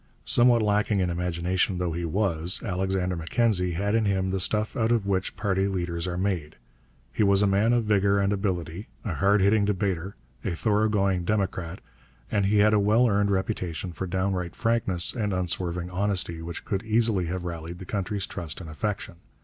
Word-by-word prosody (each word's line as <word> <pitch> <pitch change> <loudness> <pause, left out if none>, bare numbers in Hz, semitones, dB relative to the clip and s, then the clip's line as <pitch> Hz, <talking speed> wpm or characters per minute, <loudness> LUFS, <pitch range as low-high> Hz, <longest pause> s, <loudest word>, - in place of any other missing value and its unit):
Somewhat 120 -2 +5
lacking 105 0 +1
in 90 -2 +1
imagination 90 +2 0
though 90 -1 -1
he 85 +1 -3
was, 85 -1 -1
Alexander 95 0 -1
Mackenzie 90 +1 +1
had 100 +5 -1
in 115 -1 +2
him 95 -2 0
the 95 - -1
stuff 105 +5 0
out 115 -3 +1
of 115 -4 +2
which 95 -1 -1
party 95 -1 0
leaders 85 -2 -2
are 90 -1 -3
made. 90 -5 -2 0.6
He - - -1
was 100 -1 +4
a - - +4
man 100 +3 +3
of 120 -1 +2
vigour 100 -1 +2
and 100 +1 +1
ability, 95 -2 -3 0.2
a 100 - -2
hard 100 +4 +3
hitting 100 +2 +4
debater, 95 -2 -1 0.3
a 90 - -2
thoroughgoing 105 -2 +1
democrat, 95 -3 -2 0.5
and 100 -2 +2
he 105 +1 +2
had 105 +1 +5
a 105 - +4
well 110 +5 +4
earned 100 -2 +2
reputation 95 -3 -2
for 95 +3 -5
downright 95 -1 -2
frankness 105 -7 +1
and 105 -5 -1
unswerving 90 -1 -2
honesty 90 -3 -1
which 85 0 -7
could 100 -1 -1
easily 110 -5 +1
have 90 +1 -4
rallied 85 0 -6
the 95 - -9
country's 100 +1 -2
trust 85 -10 -6
and 80 -4 -8
affection. 95 +1 -4
95 Hz, 180 wpm, -26 LUFS, 90-105 Hz, 0.6 s, Somewhat